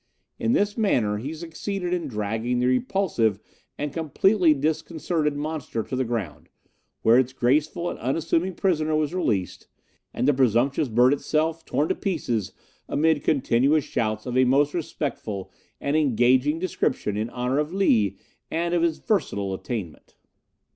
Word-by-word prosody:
In 230 - +1
this 205 +1 +1
manner 115 - +2
he 135 +7 -5
succeeded 175 +3 -4
in 170 -4 -1
dragging 110 +1 -2
the 125 - +1
repulsive 130 - +1 0.4
and 145 -1 -3
completely 170 +3 +3
disconcerted 155 +1 -1
monster 150 -6 -3
to 130 - -5
the 130 - +1
ground, 115 -10 -4 0.5
where 115 +3 +6
its 130 0 0
graceful 150 +7 +1
and - - -4
unassuming 165 +8 0
prisoner 155 -4 +1
was 155 +1 0
released, 105 - -1 0.4
and 125 - -1
the 145 - +5
presumptuous 130 +3 +2
bird 125 +4 +4
itself 160 +3 -1
torn 145 +4 0
to - - +3
pieces 120 - -2 0.4
amid 155 -1 +2
continuous 140 +2 +2
shouts 110 -3 -2
of 125 -1 -4
a 130 - +5
most 140 +3 +3
respectful 140 - -4 0.3
and 140 +1 -1
engaging 130 0 +3
description 155 - -1
in 110 +2 -2
honour 125 +3 -1
of 150 +2 -1
Lee 110 - +2 0.3
and 170 +1 -1
of 175 - +2
his 165 -2 +1
versatile 100 - -1
attainment. 95 -4 -6
145 Hz, 145 wpm, -25 LUFS, 120-165 Hz, 0.5 s, where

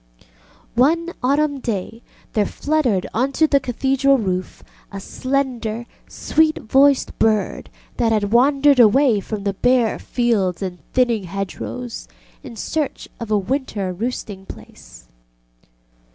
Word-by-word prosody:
One 330 +8 +2
autumn 285 +2 +1
day 225 -1 -4 0.3
there 210 -3 +1
fluttered 275 -11 0
on 260 +4 0
to 315 - +3
the 285 -2 +3
Cathedral 270 +2 +1
roof 185 -5 -3 0.3
a 195 - -6
slender, 245 -1 -2 0.2
sweet 315 0 +1
voiced 270 +4 +2
bird 215 -2 0 0.3
that 230 -2 +2
had 210 -2 0
wandered 275 +3 +4
away 240 0 +5
from 205 +1 -5
the 200 -1 -1
bare 245 +2 +2
fields 205 -7 0
and 180 -2 -5
thinning 235 -6 +2
hedgerows 195 +6 -6 0.3
in 235 - -10
search 295 +6 -3
of 230 -2 -6
a 215 - +3
winter 205 -4 -2
roosting 205 -2 -5
place. - - -13
240 Hz, 125 wpm, -20 LUFS, 205-275 Hz, 0.3 s, away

